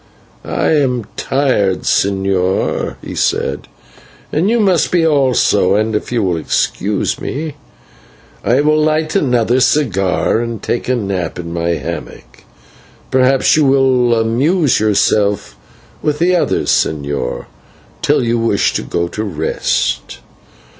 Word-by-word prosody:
"I - - -1
am 125 -5 0
tired, 125 -9 0
señor," 95 -1 0
he - - -7
said, - - -1 0.7
"as 155 - +1
you 230 +5 +2
must 190 -7 +2
be 175 -2 +2
also, 130 - +2
and, 110 +1 0
if 105 - -3
you 120 -3 0
will 90 -3 0
excuse 100 +5 -1
me, 155 +2 -4 0.9
I 125 +4 +2
will 155 +1 +2
light 155 +2 0
another 125 - +2
cigar 110 -8 +1
and 115 -2 -4
take 120 - -3
a 130 - +2
nap 95 -7 -3
in 85 -1 -6
my 85 0 -1
hammock. - - -8 0.7
Perhaps 130 +1 +3
you 155 - +3
will 130 -3 +3
amuse 135 +7 +1
yourself 105 - +1 0.5
with 150 -1 -1
the 180 +3 +2
others, 175 - 0
señor, 70 -4 -1 0.6
till - - +2
you 120 0 0
wish 115 -3 +1
to - - -1
go 85 0 -2
to 110 - -4
rest." 80 - -2
115 Hz, 130 wpm, -15 LUFS, 95-145 Hz, 0.9 s, Perhaps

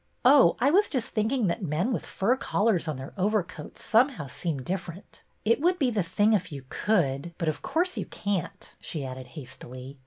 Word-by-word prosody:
Oh, 275 +2 +7
I 275 +3 +4
was 405 +5 +4
just 255 -5 -1
thinking 225 +2 +1
that 180 +5 -1
men 175 - 0
with 235 - -3
fur 225 +7 +1
collars 205 -8 +1
on 155 -3 -2
their 130 +1 -8
overcoats 185 -5 -2
somehow 240 - +3
seem 140 0 -4
differ 175 +1 -3
ent. 185 - -16 0.2
It 230 +5 +3
would 355 +3 +3
be 265 -6 +2
the 215 -3 +1
thing 205 +5 +2
if 185 -4 0
you 140 -3 -7
could, 170 -5 0
but 165 - -2
of 155 - -1
course 360 +3 0
you - - -3
can't," 200 -4 -3
she 150 -4 -5
added 130 0 -7
hastily. 130 0 -9
190 Hz, 195 wpm, -27 LUFS, 150-230 Hz, 0.2 s, Oh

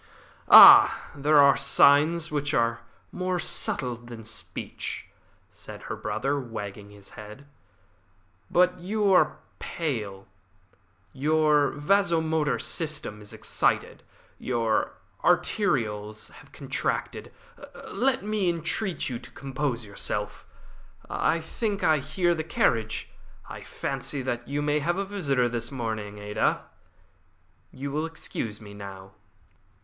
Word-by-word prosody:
"Ah, - - +9
there 150 +2 +2
are 140 -1 +7
signs 155 +4 +4
which 145 0 -1
are 115 0 +1 0.3
more 185 0 -2
subtle 125 -6 0
than 120 -1 -11
speech," 110 - -7 0.5
said - - -11
her - - -5
brother, 140 +1 -2
wagging 105 -5 -7
his 100 -1 -12
head. 110 +6 -11 1.0
"But 180 +1 +2
you 200 +2 +1
are - - +3 0.2
pale. 105 - -4 0.9
Your 150 +1 +2
vasomotor 160 -2 +1
system 150 -10 -3
is 105 - -9
excited. - - -1 0.4
Your 115 -3 0 0.3
arterioles 110 - 0
have - - -16
contracted. - - -3 0.6
Let 260 -4 +1
me 210 -3 0
entreat 170 +2 -1
you 120 -3 -4
to 125 - -13
compose 135 -3 -4
yourself. 105 +1 -5 0.6
I 165 - +1
think 200 +5 -3
I 155 -2 +4
hear 165 +5 0
the 160 -1 -3
carriage. 115 -8 -1 0.4
I - - -9
fancy 140 -3 -4
that 120 -2 -4
you 145 +1 -2
may 150 0 +1
have 170 +5 -1
a 195 - -1
visitor 140 -11 0
this 120 0 -4
morning, 110 -5 -4
Ada. 105 0 -1 1.1
You 140 +2 -6
will 155 +3 -2
excuse 115 -9 -6
me 105 -2 -12
now." 95 -2 -10
140 Hz, 115 wpm, -26 LUFS, 115-165 Hz, 1.1 s, Ah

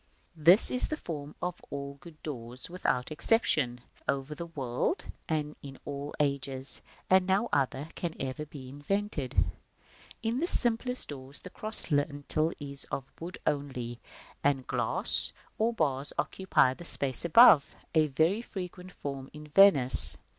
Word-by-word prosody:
This 170 +6 +7
is 250 - +1
the 310 - -4
form 150 - -8
of 180 -1 -4
all 140 0 -7
good 155 0 -16
doors, 125 -1 -4
without 155 -7 -2
exception, 150 - 0 0.3
over 140 +2 -2
the 170 +2 -8
whole 165 - -24
world 130 - -2 0.2
and 150 -2 -3
in 135 -1 -11
all 145 0 -7
ages, 140 -2 -2 0.3
and 185 0 +3
no 200 +5 0
other 140 +2 -1
can 170 -2 -5
ever 135 +2 -5
be 140 -3 -11
invented. 145 0 -4
§ - - -13
III. - - +4 0.8
In 230 +3 -1
the 340 - -1
simplest 250 -3 -1
doors 135 -1 -8
the 185 - -11
cross 215 -5 -5
lintel 145 +2 -1
is 140 -1 -7
of 135 0 -7
wood 175 +2 -8
only, 130 -5 -4 0.4
and 135 -2 0
glass - - +3 0.3
or 225 +2 +1
bars 145 - -2
occupy 185 -9 +1
the 175 - -12
space 140 -6 -3
above, 170 - +6 0.2
a 155 -2 +3
very 160 +10 0
frequent 180 -4 -9
form 140 -4 -7
in 150 0 -12
Venice. 155 - +10
150 Hz, 155 wpm, -28 LUFS, 135-180 Hz, 0.8 s, Venice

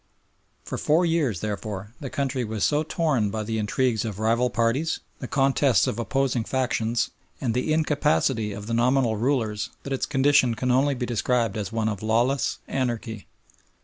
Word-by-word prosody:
For - - -5
four 160 +4 +3
years, 150 - 0
therefore, 105 0 -4
the 140 - -5
country 135 -3 -1
was 110 -2 -3
so 150 0 +3
torn 155 - 0
by 110 +1 -3
the 110 +1 -2
intrigues 110 +2 0
of 110 -4 -4
rival 115 +3 +2
parties, 120 +8 0 0.2
the 130 - -5
contests 135 -1 +3
of 110 - -2
opposing 130 -1 0
factions, 120 -2 0 0.3
and 120 -4 -1
the 125 +6 0
incapacity 145 -7 +1
of 100 0 -7
the 115 - -3
nominal 120 0 +2
rulers 110 -3 0
that 140 - -4
its 135 - -1
condition 135 -3 +3
can 125 +3 0
only 135 +3 +3
be 125 -1 -2
described 120 -2 0
as 105 0 -3
one 115 -1 0
of 105 -3 -2
lawless 120 +5 +1
anarchy. 120 -4 -3
120 Hz, 170 wpm, -25 LUFS, 110-135 Hz, 0.3 s, four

